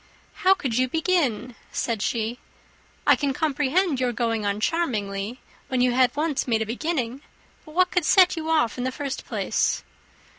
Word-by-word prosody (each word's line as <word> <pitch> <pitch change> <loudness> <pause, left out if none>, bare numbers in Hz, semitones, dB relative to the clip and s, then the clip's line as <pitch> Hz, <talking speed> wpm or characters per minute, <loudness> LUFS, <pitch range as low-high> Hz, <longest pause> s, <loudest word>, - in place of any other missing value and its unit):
"How 380 +1 +6
could 255 -9 -2
you 255 - +3
begin?" 275 - 0 0.2
said 230 -4 -2
she. 230 +2 -1 0.7
"I - - +6
can 280 -2 -1
comprehend 300 +1 +1
your 250 -1 +1
going 225 -2 -1
on 200 +1 -1
charmingly, 215 -8 -1 0.3
when 260 - -1
you 250 0 +3
had 255 +1 +3
once 300 -2 -1
made 225 -2 +1
a - - -6
beginning; 255 +1 -2 0.4
but 310 -1 -13
what 365 0 +3
could 360 - +1
set 370 0 +5
you 320 -1 -4
off 285 -8 +1
in - - -1
the 260 - -1
first 275 0 -5
place?" - - 0
260 Hz, 175 wpm, -24 LUFS, 230-320 Hz, 0.7 s, How